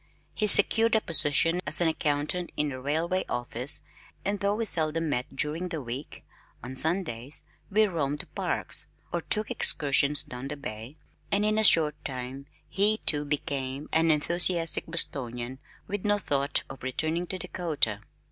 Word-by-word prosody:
He 215 Hz, -, -1 dB
secured 225 Hz, +2 st, +7 dB
a 220 Hz, -, +2 dB
position 165 Hz, +1 st, +1 dB
as -, -, +7 dB
an 175 Hz, -, +3 dB
accountant 155 Hz, +3 st, -2 dB
in 150 Hz, -1 st, 0 dB
a 130 Hz, -1 st, -7 dB
railway 165 Hz, +7 st, -1 dB
office 125 Hz, +4 st, -3 dB, 0.4 s
and 200 Hz, +1 st, -1 dB
though 200 Hz, 0 st, 0 dB
we 225 Hz, +1 st, -2 dB
seldom 165 Hz, -3 st, 0 dB
met 125 Hz, -1 st, -3 dB
during 155 Hz, +6 st, -3 dB
the 165 Hz, -3 st, -4 dB
week, 125 Hz, +2 st, -8 dB, 0.4 s
on 130 Hz, -, -7 dB
Sundays 155 Hz, -5 st, 0 dB, 0.3 s
we 215 Hz, +2 st, +3 dB
roamed 150 Hz, -7 st, -2 dB
the -, -, -2 dB
parks, -, -, -2 dB, 0.3 s
or -, -, -1 dB
took 215 Hz, -1 st, -2 dB
excursions 145 Hz, -1 st, +2 dB
down 125 Hz, +2 st, -8 dB
the 145 Hz, +1 st, -6 dB
bay, 115 Hz, +1 st, -8 dB, 0.3 s
and 205 Hz, +1 st, +2 dB
in 215 Hz, 0 st, +1 dB
a -, -, +1 dB
short 155 Hz, -6 st, +4 dB
time 130 Hz, +1 st, -7 dB, 0.2 s
he 210 Hz, +5 st, +1 dB
too 150 Hz, -1 st, +3 dB
became 140 Hz, -1 st, -4 dB
an 165 Hz, 0 st, +3 dB
enthusiastic 170 Hz, +2 st, +4 dB
Bostonian 130 Hz, -6 st, 0 dB, 0.3 s
with 205 Hz, -1 st, -4 dB
no 205 Hz, 0 st, +2 dB
thought 140 Hz, -7 st, 0 dB
of 135 Hz, -, -11 dB
returning 160 Hz, +7 st, -2 dB
to 190 Hz, -, -5 dB
Dakota. 160 Hz, -, -2 dB
150 Hz, 160 wpm, -27 LUFS, 135-180 Hz, 0.4 s, secured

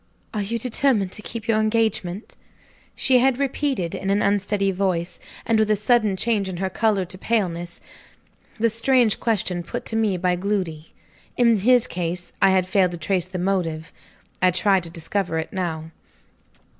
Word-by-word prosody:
"Are 210 Hz, -, -1 dB
you 220 Hz, +4 st, -2 dB
determined 230 Hz, -4 st, +1 dB
to 215 Hz, -, -4 dB
keep 225 Hz, 0 st, -7 dB
your 220 Hz, -2 st, +2 dB
engagement?" 215 Hz, -3 st, -1 dB, 0.6 s
She 260 Hz, -1 st, +4 dB
had 260 Hz, 0 st, +3 dB
repeated 270 Hz, -, -1 dB
in 195 Hz, -, -4 dB
an 200 Hz, +1 st, +2 dB
unsteady 200 Hz, 0 st, +1 dB
voice, 180 Hz, -2 st, -2 dB, 0.3 s
and 225 Hz, -1 st, +2 dB
with 215 Hz, -1 st, +2 dB
a 215 Hz, -, +4 dB
sudden 215 Hz, -2 st, +2 dB
change 205 Hz, -2 st, 0 dB
in 180 Hz, -, -5 dB
her 190 Hz, +1 st, -2 dB
color 210 Hz, -2 st, +1 dB
to 185 Hz, +1 st, -8 dB
paleness 175 Hz, -7 st, -2 dB, 0.8 s
the 230 Hz, 0 st, +2 dB
strange 230 Hz, -1 st, +2 dB
question 190 Hz, -6 st, 0 dB
put 170 Hz, -, -6 dB
to 225 Hz, -, -3 dB
me 215 Hz, -4 st, +1 dB
by 180 Hz, 0 st, +1 dB
Gloody. 180 Hz, -5 st, -3 dB, 0.5 s
In 235 Hz, -2 st, +5 dB
his 245 Hz, +4 st, +4 dB
case 175 Hz, 0 st, -4 dB
I 195 Hz, -, +6 dB
had 190 Hz, -1 st, +3 dB
failed 185 Hz, -2 st, +2 dB
to -, -, -5 dB
trace 175 Hz, +2 st, -1 dB
the 185 Hz, 0 st, -6 dB
motive. 175 Hz, -3 st, -2 dB, 0.5 s
I 185 Hz, -, +5 dB
tried 185 Hz, +2 st, +2 dB
to -, -, -6 dB
discover 165 Hz, +1 st, -2 dB
it 160 Hz, -, -4 dB
now. 165 Hz, -4 st, -3 dB
195 Hz, 170 wpm, -23 LUFS, 180-225 Hz, 0.8 s, I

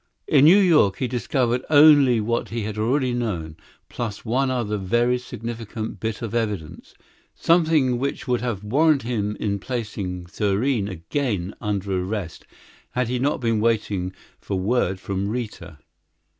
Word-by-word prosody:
In 145 Hz, -2 st, +5 dB
New 175 Hz, +6 st, +8 dB
York 155 Hz, -, +4 dB
he 130 Hz, -, -1 dB
discovered 125 Hz, 0 st, 0 dB
only 145 Hz, -5 st, +7 dB
what 115 Hz, +2 st, -1 dB
he 115 Hz, -1 st, -3 dB
had 105 Hz, 0 st, -4 dB
already 125 Hz, +3 st, +1 dB
known, 90 Hz, -10 st, -3 dB, 0.3 s
plus 115 Hz, -3 st, -5 dB
one 130 Hz, +4 st, +1 dB
other 115 Hz, -5 st, -1 dB
very 120 Hz, +6 st, +1 dB
significant 115 Hz, -2 st, -6 dB
bit 110 Hz, +1 st, -4 dB
of 115 Hz, -2 st, -4 dB
evidence 105 Hz, -9 st, -4 dB, 0.4 s
something 155 Hz, -7 st, +3 dB
which 140 Hz, +1 st, -3 dB
would 125 Hz, -1 st, +1 dB
have 115 Hz, -5 st, -3 dB
warranted 140 Hz, +3 st, +2 dB
him 105 Hz, -4 st, -1 dB
in 100 Hz, -2 st, -1 dB
placing 100 Hz, -6 st, -4 dB
Thurene 105 Hz, +5 st, 0 dB
again 95 Hz, -, -3 dB
under 100 Hz, -3 st, -1 dB
arrest 95 Hz, -4 st, -5 dB, 0.5 s
had 125 Hz, -2 st, 0 dB
he 125 Hz, 0 st, -1 dB
not 140 Hz, +1 st, 0 dB
been 115 Hz, -2 st, +1 dB
waiting 105 Hz, -5 st, 0 dB, 0.3 s
for 100 Hz, -, -4 dB
word 95 Hz, -2 st, 0 dB
from 95 Hz, +1 st, -3 dB
Rita. 105 Hz, -8 st, -5 dB
115 Hz, 145 wpm, -23 LUFS, 100-125 Hz, 0.5 s, New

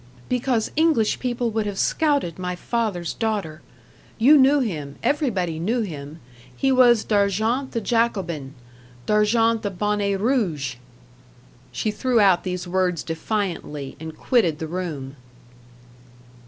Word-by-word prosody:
"Because 250 Hz, -2 st, 0 dB
English 310 Hz, -9 st, +2 dB
people 240 Hz, -2 st, -1 dB
would 215 Hz, -1 st, -1 dB
have 200 Hz, -1 st, -4 dB
scouted 285 Hz, -, 0 dB
my 180 Hz, 0 st, -3 dB
father's 195 Hz, -5 st, -2 dB
daughter. 205 Hz, -9 st, -3 dB, 0.6 s
You 265 Hz, +7 st, +6 dB
knew 280 Hz, +1 st, +5 dB
him 155 Hz, -, -3 dB
everybody 195 Hz, -, 0 dB
knew 225 Hz, +8 st, 0 dB
him 155 Hz, -5 st, -7 dB, 0.4 s
he 270 Hz, -1 st, +2 dB
was 245 Hz, -3 st, +5 dB
D'Argent 215 Hz, +6 st, 0 dB
the 230 Hz, -, -1 dB
Jacobin 190 Hz, -, -1 dB, 0.5 s
D'Argent 225 Hz, +2 st, +2 dB
the 205 Hz, -, -2 dB
Bonnet 200 Hz, +1 st, -1 dB
Rouge." 175 Hz, -, 0 dB, 0.9 s
She 210 Hz, -, -1 dB
threw 245 Hz, +2 st, +1 dB
out 195 Hz, -4 st, +4 dB
these 180 Hz, -1 st, -4 dB
words 180 Hz, -2 st, 0 dB
defiantly, 165 Hz, -5 st, -3 dB
and 160 Hz, 0 st, -8 dB
quitted 195 Hz, -, +2 dB
the 160 Hz, -, -4 dB
room. 155 Hz, -6 st, -5 dB
205 Hz, 125 wpm, -23 LUFS, 170-235 Hz, 0.9 s, You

